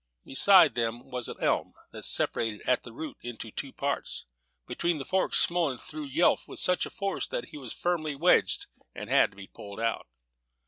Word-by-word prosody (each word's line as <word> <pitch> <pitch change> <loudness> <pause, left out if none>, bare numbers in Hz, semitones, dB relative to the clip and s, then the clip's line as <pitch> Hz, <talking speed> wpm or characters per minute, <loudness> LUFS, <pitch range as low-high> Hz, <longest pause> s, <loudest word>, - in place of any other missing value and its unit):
Beside 180 +3 +6
them 120 +2 -3
was 125 -2 -3
an - - -7
elm, - - +1 0.2
that - - -8
separated 110 -3 0
at 125 - +3
the 120 - -11
root 155 +7 -7
into 115 -2 -7
two 135 +4 -4
parts. 140 +1 -3 0.4
Between 170 -2 -1
the 135 - -5
forks 190 0 +1
Smullen 170 -7 +2
threw 150 +4 -7
Yelf 150 +6 +2
with - - -9
such 180 0 +2
force, 195 -1 -3
that - - -4
he 155 - -9
was 125 -5 -7
firmly 155 -4 -1
wedged, 170 +6 +3 0.3
and - - -7
had - - +5
to 100 - -22
be 100 - -8
pulled 100 +1 -10
out. 115 0 -1
140 Hz, 185 wpm, -29 LUFS, 115-170 Hz, 0.4 s, Beside